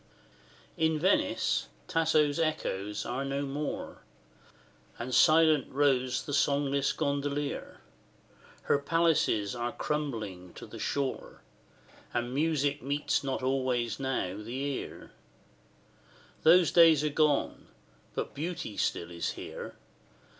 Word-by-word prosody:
III. 160 - +3
In 160 -1 -1
Venice, 190 +5 +1 0.2
Tasso's 160 -3 +2
echoes 105 -11 -2
are 125 +3 -2
no 140 +1 -2
more, 145 +2 -4 1.0
And 125 +2 -5
silent 155 -2 +5
rows 130 -2 +1
the 145 - -5
songless 140 -1 +2
gondolier; 140 0 -3 0.8
Her 140 - +2
palaces 140 -10 +1
are 120 0 -2
crumbling 110 - -4
to - - -9
the - - -10
shore, 140 -2 -3 0.7
And 120 +1 -1
music 145 -1 +1
meets 145 +3 0
not 135 -1 -2
always 130 -3 0
now 130 -8 -2
the 115 +4 -6
ear: 140 0 -5 1.3
Those 170 0 +6
days 165 -4 +6
are 150 - +1
gone 150 -1 +1 0.5
but - - -3
beauty 160 - -5
still 85 +1 -1
is 85 -1 -3
here. - - -8
140 Hz, 110 wpm, -30 LUFS, 130-155 Hz, 1.3 s, Those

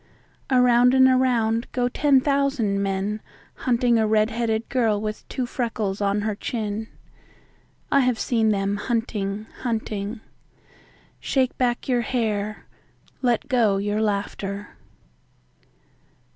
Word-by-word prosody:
Around 250 -1 +5
and 260 0 +7
around 240 -3 +2
go 245 -1 +1
ten 275 +1 +3
thousand 275 -8 +1
men 200 +2 -2 0.3
hunting 240 -2 +1
a 220 - +2
red 215 0 +2
headed 225 -1 -1
girl 225 -5 +1
with 215 0 -5
two 255 - -2
freckles 220 -5 -3
on 200 +1 +1
her 215 0 -1
chin.I 220 +5 -5
have 250 -3 +2
seen 225 -1 +1
them 200 -1 0
hunting, 210 -3 -2
hunting. 220 -2 -3 1.0
Shake 260 -2 0
back 245 -1 0
your 250 -2 +2
hair; 215 -3 -2 0.6
let 245 +1 +1
go 230 -7 +3
your 205 +2 -1
laughter. 200 -1 -2
225 Hz, 115 wpm, -24 LUFS, 210-250 Hz, 1.0 s, and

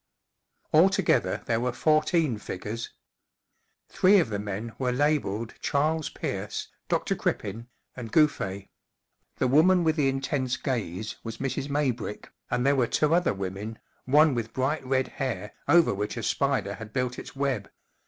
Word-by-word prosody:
Altogether 190 +4 +3
there 115 - +1
were 125 +1 0
fourteen 155 - +2
figures. 105 +4 -5 1.0
Three 195 +3 +5
of 150 - +1
the 100 - -1
men 105 +3 -5
were 125 -2 +1
labelled 125 -6 0
Charles 155 +2 0
Peafce, - - -4 0.2
Dr. - - +1
Crippen, 115 +4 -3 0.3
and 115 -4 -7
Gouff6. 100 -11 +1 0.7
The 130 - +1
woman 170 +7 +5
with 160 -1 +2
the 140 -3 +3
intense 135 -1 -1
gaze 110 - -3
was 115 -1 -6
Mrs. 135 +2 -3
Maybrick, 130 -7 -2 0.2
and 125 +1 0
there 140 +1 +4
were 125 -3 +2
two 155 +1 +2
other 175 - +2
women, 100 +3 -5 0.3
one 150 +3 +5
with 115 -2 -3
bright 135 +4 0
red 130 0 +1
hair 115 -7 -4
over 170 -7 +5
which 105 +4 -3
a 115 - -4
spider 135 -8 0
had 110 +2 -9
built 125 0 -1
its - - -10
web. 135 -7 -1
130 Hz, 150 wpm, -27 LUFS, 110-150 Hz, 1.0 s, Three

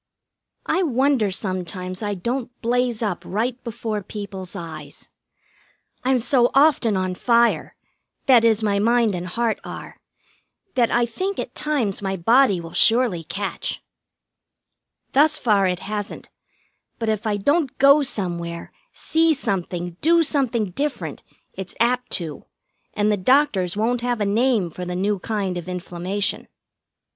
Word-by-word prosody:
I 370 - +1
wonder 265 - +2
sometimes 185 0 -4
I 205 -1 -2
don't 240 +6 -3
blaze 240 -1 0
up 200 -5 -2
right 235 +6 -2
before 225 -2 -4
people's 195 -2 -7
eyes. 155 -4 -9 0.9
I'm 260 0 +3
so 245 0 +3
often 270 -8 +4
on 185 -1 -1
fire 235 +5 +2 0.5
that 250 -4 +6
is, 225 -1 +3
my 200 -1 +1
mind 230 0 +3
and 180 0 -4
heart 230 +4 -1
are - - -9 0.8
that 240 -3 +2
I 240 0 +2
think 370 - -3
at - - -4
times 265 -11 -1
my 195 -1 -2
body 225 +1 +4
will 165 -1 -9
surely 225 -7 +3
catch. 195 +4 -4 1.3
Thus 310 +3 +4
far 205 -5 +2
it 180 -1 -2
hasn't, 210 -1 -5 0.7
but 225 - -3
if 220 +1 -1
I 210 -1 0
don't 285 - +1
go 280 +2 +6
somewhere, 170 -9 -3 0.2
see 325 0 +1
something, 180 -7 -3
do 335 +1 +4
something 250 - 0
different, 290 +9 -3 0.3
it's 190 -2 -8
apt 250 +2 +1
to, 160 -5 -4 0.5
and 210 0 +2
the 210 - +1
doctors 200 - +2
won't 235 +3 0
have 245 -1 -1
a 205 - +1
name 215 -3 +1
for 180 - -7
the 180 0 -4
new 200 +2 0
kind 195 -3 -2
of 175 - -9
inflammation. 180 +2 -3
215 Hz, 140 wpm, -22 LUFS, 185-250 Hz, 1.3 s, that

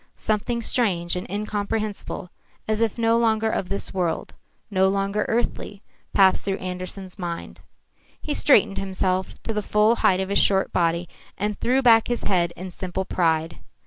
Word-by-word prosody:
Something 230 +2 -1
strange 180 -9 0
and 180 - -5
incomprehensible, 210 -1 -3 0.4
as 215 +1 0
if 225 -1 +1
no 230 0 +3
longer 220 -1 +2
of 180 - -2
this 200 - -2
world, 180 -3 -2 0.4
no 190 -1 +3
longer 195 +1 0
earthly, 215 -3 -2 0.3
passed 190 -1 +4
through 195 -1 -1
Andersen's 185 +1 -6
mind. 170 -2 -6 0.6
He 300 - -3
straightened 220 -10 +4
himself 190 -1 -1
to 225 - -3
the 210 - -1
full 210 +3 +3
height 185 -1 +3
of 190 0 -2
his 200 - +3
short 195 -1 +2
body 170 0 +1 0.3
and 210 0 -2
threw 260 +2 +2
back 225 -2 +6
his 240 -1 -2
head 175 -3 +1
in 185 +1 -7
simple 185 +1 -4
pride. 165 -3 0
195 Hz, 160 wpm, -24 LUFS, 185-220 Hz, 0.6 s, back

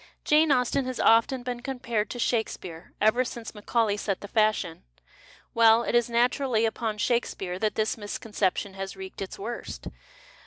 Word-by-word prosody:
Jane 305 +1 +4
Austen 255 +1 +2
has 255 -1 -4
often 230 +3 +4
been 245 -1 -4
compared 235 -5 -2
to - - -5
Shakesj^care, 215 -8 -2
ever 220 +4 +4
since 235 -2 -7
Macaulay 210 0 0
set 200 -2 -2
the 205 - -7
fashion. 215 -6 +1 0.7
Well, 230 0 +6
it - - -2
is 240 0 +3
naturally 240 0 +2
upon 220 -1 -2
ShakesiDcare 210 -6 -1
that 215 0 0
this 220 +1 0
misconception 205 -2 -2
has 195 0 -6
wreaked 190 0 -8
its 195 - -5
worst. 235 +4 -6
225 Hz, 155 wpm, -27 LUFS, 205-245 Hz, 0.7 s, Well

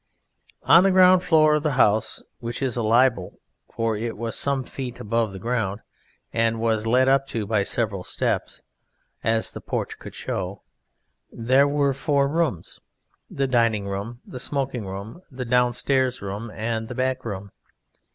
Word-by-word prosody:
On 170 - +7
the 195 - +4
ground 185 -1 +6
floor 155 -3 +4
of 150 - +2
the 150 -1 0
House 110 -4 +2 0.2
(which 120 +3 -5
is 130 -4 -1
a 120 - -1
libel, 115 -3 +2 0.3
for 115 -1 -1
it 115 +1 -4
was 115 0 -3
some 140 -2 0
feet 125 -1 -7
above 115 0 0
the 95 - -8
ground, 110 -1 -2 0.5
and 115 0 +1
was 110 -1 0
led 130 +3 +4
up 135 0 +3
to 110 -5 -3
by 110 0 +1
several 100 -2 -2
steps, - - -2 0.6
as 115 0 +1
the - - -8
porch - - -4
could - - -10
show) 95 +1 -4 0.7
there 130 +5 +3
were 140 -1 +1
four 140 0 +1
rooms 145 - -2 0.5
the 135 - -1
Dining 115 -5 +1
room, 100 +5 -5
the 125 - -8
Smoking 130 -5 -3
room, 100 - -7
the 130 -2 -6
Downstairs 125 +1 +1
room 100 +3 -5
and 110 +1 -3
the 125 - -7
Back 130 0 -1
room. 100 -3 -6
120 Hz, 160 wpm, -24 LUFS, 110-135 Hz, 0.7 s, On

